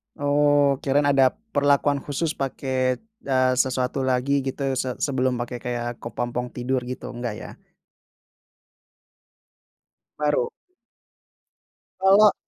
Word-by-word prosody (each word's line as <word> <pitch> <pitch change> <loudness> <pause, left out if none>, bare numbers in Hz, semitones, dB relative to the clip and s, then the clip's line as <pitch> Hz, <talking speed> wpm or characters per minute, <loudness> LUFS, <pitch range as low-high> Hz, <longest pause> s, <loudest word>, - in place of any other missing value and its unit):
Oh 145 -1 +3
kirain 140 +1 +1
ada 135 -2 +4 0.2
perlakuan 145 -3 +2
khusus 145 +4 -2
pakai, 130 -2 -1 0.2
eee, 130 -1 +3
sesuatu 130 +1 0
lagi 130 +2 +1
gitu 135 +1 -3 0.2
se 130 -1 -2
sebelum 130 -2 0
pakai 120 0 -5
kayak 120 0 -4
kepompong 120 +1 -4
tidur 130 +2 -1
gitu, 125 +1 -6
enggak 120 -3 -4
ya? - - -8 2.7
Baru? 150 -4 +1 1.5
Kalau 200 +2 +6
130 Hz, 100 wpm, -24 LUFS, 125-145 Hz, 2.7 s, Kalau